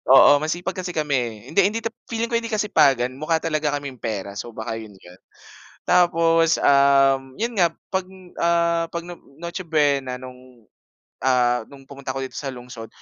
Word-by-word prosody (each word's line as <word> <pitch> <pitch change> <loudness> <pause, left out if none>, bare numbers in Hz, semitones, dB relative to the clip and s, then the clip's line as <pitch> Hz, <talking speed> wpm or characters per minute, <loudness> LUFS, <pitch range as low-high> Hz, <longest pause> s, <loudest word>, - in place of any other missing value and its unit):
oo, 135 - +8
masipag 175 +4 -3
kasi 180 - -5
kami, 150 -2 -2
eh. 120 -3 -2 0.2
Hindi 200 - +4
hindi 225 +2 -3 0.3
feeling 230 0 -1
ko - - +3
hindi 230 - -6
kasipagan 140 - +3
mukha 160 +2 +1
talaga 155 -2 0
kaming 135 -3 -8
pera 100 -3 -4
so, 120 - -8
baka 110 0 -4
'yon 110 -2 -11
'yon. 90 +1 -16 0.7
Tapos, 165 -2 +3
um, 135 -1 +4
'yon 235 +1 -1
nga 170 -3 +3 0.2
'pag, 190 -1 0 0.4
ah, 170 0 +2
'pag 170 - -2
No 175 -1 -8 0.2
Noche 170 +1 -5
Buena 140 -5 +1
nung, 130 -1 -13 0.6
ah, 125 -2 +2
nung 135 -1 -14
pumunta 140 -2 -6
ako 135 - -2
dito - - -13
sa 140 - -5
lungsod 125 -2 -10
140 Hz, 170 wpm, -22 LUFS, 125-170 Hz, 0.7 s, oo